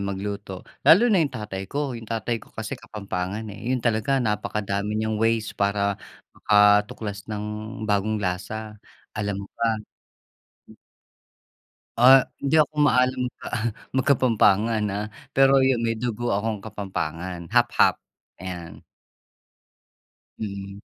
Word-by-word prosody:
magluto 100 Hz, +1 st, -5 dB, 0.4 s
lalo 180 Hz, +8 st, +8 dB
na 190 Hz, -, +4 dB
yung 155 Hz, -, +2 dB
tatay 105 Hz, -3 st, -5 dB
ko. -, -, -6 dB, 0.2 s
Yung 115 Hz, -1 st, -11 dB
tatay 115 Hz, +1 st, -1 dB
ko -, -, -17 dB
kasi 110 Hz, +1 st, -5 dB
Kapampangan, 100 Hz, -2 st, -5 dB
eh, 100 Hz, -, -10 dB
'yon 130 Hz, -1 st, +1 dB
talaga 115 Hz, +3 st, +1 dB
napakadami 105 Hz, -2 st, -2 dB
niyang 110 Hz, 0 st, -1 dB
ways 115 Hz, -1 st, +1 dB
para 100 Hz, 0 st, +1 dB, 0.4 s
makatuklas 105 Hz, 0 st, +2 dB
ng 105 Hz, -1 st, -4 dB, 0.4 s
bagong 105 Hz, +1 st, +1 dB
lasa, 105 Hz, +3 st, -4 dB, 0.4 s
alam 105 Hz, -1 st, -2 dB
mo -, -, -15 dB
ba? 115 Hz, -1 st, +2 dB, 2.2 s
Ah, 130 Hz, +2 st, +7 dB, 0.2 s
hindi 155 Hz, +3 st, +4 dB
ako 155 Hz, 0 st, +1 dB
maalam 130 Hz, -1 st, +3 dB, 0.8 s
mag 130 Hz, -, +2 dB
Kapampangan, 115 Hz, -5 st, +3 dB
ah, 105 Hz, +2 st, -3 dB, 0.2 s
pero 135 Hz, 0 st, +5 dB
yung 130 Hz, -3 st, +2 dB
may 115 Hz, -1 st, 0 dB
dugo 120 Hz, +1 st, -3 dB
akong 105 Hz, 0 st, -1 dB
Kapampangan 90 Hz, -4 st, -5 dB
half-half, -, -, +3 dB, 0.4 s
ayan. 90 Hz, -2 st, -8 dB, 1.6 s
Mm. 100 Hz, -2 st, -6 dB
105 Hz, 120 wpm, -24 LUFS, 100-115 Hz, 2.2 s, lalo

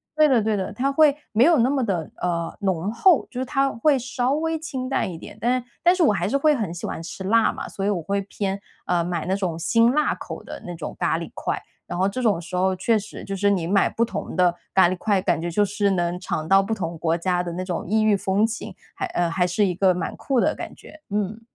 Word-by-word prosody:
对 310 Hz, 0 st, +5 dB
的 255 Hz, -5 st, +4 dB
对 215 Hz, 0 st, +1 dB
的， 190 Hz, -2 st, -3 dB
它 265 Hz, +6 st, 0 dB
会 290 Hz, 0 st, +5 dB, 0.2 s
没 225 Hz, +3 st, +4 dB
有 330 Hz, +1 st, +5 dB
那 240 Hz, +2 st, +4 dB
么 275 Hz, -2 st, +1 dB
的， 180 Hz, -8 st, -2 dB
呃， 170 Hz, -2 st, -2 dB
浓 190 Hz, 0 st, 0 dB
厚， 315 Hz, +8 st, +4 dB
就 250 Hz, -, -6 dB
是 -, -, -1 dB
它 275 Hz, 0 st, +1 dB
会 275 Hz, +5 st, +2 dB
稍 245 Hz, +1 st, -1 dB
微 320 Hz, +2 st, 0 dB
清 265 Hz, -5 st, -4 dB
淡 225 Hz, -8 st, -1 dB
一 165 Hz, -, -7 dB
点。 205 Hz, -, -11 dB
但 245 Hz, +3 st, +1 dB
是 245 Hz, -, -13 dB, 0.2 s
但 350 Hz, +1 st, +5 dB
是 365 Hz, -, -1 dB
我 280 Hz, -, +4 dB
还 195 Hz, -, -1 dB
是 275 Hz, -, +2 dB
会 300 Hz, +1 st, +3 dB
很 210 Hz, -9 st, -3 dB
喜 175 Hz, -, -6 dB
欢 -, -, -5 dB
吃 170 Hz, +3 st, -7 dB
辣 225 Hz, +4 st, +3 dB
嘛， -, -, -6 dB
所 195 Hz, -, -4 dB
以 -, -, +2 dB
我 195 Hz, -4 st, 0 dB
会 200 Hz, +4 st, -1 dB
偏 195 Hz, 0 st, -3 dB, 0.3 s
呃， 175 Hz, -1 st, +1 dB
买 170 Hz, -1 st, -3 dB
那 190 Hz, -, 0 dB
种 185 Hz, -5 st, -2 dB
辛 230 Hz, +7 st, +3 dB
辣 300 Hz, +3 st, +1 dB
口 -, -, -8 dB
的 -, -, -9 dB
那 175 Hz, -, -6 dB
种 165 Hz, -, -6 dB
咖 -, -, +1 dB
喱 -, -, -6 dB
块， -, -, -2 dB, 0.3 s
然 -, -, -4 dB
后 190 Hz, +2 st, +2 dB
这 225 Hz, +6 st, -3 dB
种 215 Hz, -7 st, +2 dB
时 180 Hz, +1 st, -7 dB
候 185 Hz, +1 st, +2 dB
确 215 Hz, +4 st, +2 dB
实， 210 Hz, -, -9 dB
就 195 Hz, -, -4 dB
是 200 Hz, +1 st, +2 dB
你 185 Hz, -5 st, +1 dB
买 195 Hz, +2 st, +3 dB
不 230 Hz, -, +1 dB
同 -, -, -5 dB
的 180 Hz, -1 st, +4 dB, 0.2 s
咖 185 Hz, -2 st, +6 dB
喱 185 Hz, -, -1 dB
块， 200 Hz, 0 st, +1 dB
感 175 Hz, -, 0 dB
觉 175 Hz, -, -2 dB
就 205 Hz, +5 st, +2 dB
是 205 Hz, +1 st, 0 dB
能 175 Hz, -1 st, 0 dB
尝 160 Hz, -4 st, -3 dB
到 195 Hz, +2 st, +6 dB
不 195 Hz, -, -5 dB
同 175 Hz, -6 st, -3 dB
国 165 Hz, 0 st, +1 dB
家 180 Hz, +1 st, 0 dB
的 175 Hz, -1 st, -4 dB
那 180 Hz, +2 st, -3 dB
种 175 Hz, -2 st, -3 dB
异 215 Hz, +2 st, +2 dB
域 215 Hz, -1 st, +4 dB
风 195 Hz, +2 st, +1 dB
情， 225 Hz, +2 st, -5 dB, 0.2 s
还 385 Hz, -, -3 dB
呃， 175 Hz, -, 0 dB
还 180 Hz, +1 st, +1 dB
是 190 Hz, +4 st, +2 dB
一 185 Hz, -, 0 dB
个 190 Hz, +1 st, +3 dB
蛮 175 Hz, -1 st, -4 dB
酷 270 Hz, -3 st, 0 dB
的 -, -, +2 dB
感 -, -, -8 dB
觉， 310 Hz, -, -15 dB
嗯。 210 Hz, +2 st, -2 dB
200 Hz, 290 characters per minute, -23 LUFS, 180-245 Hz, 0.3 s, 咖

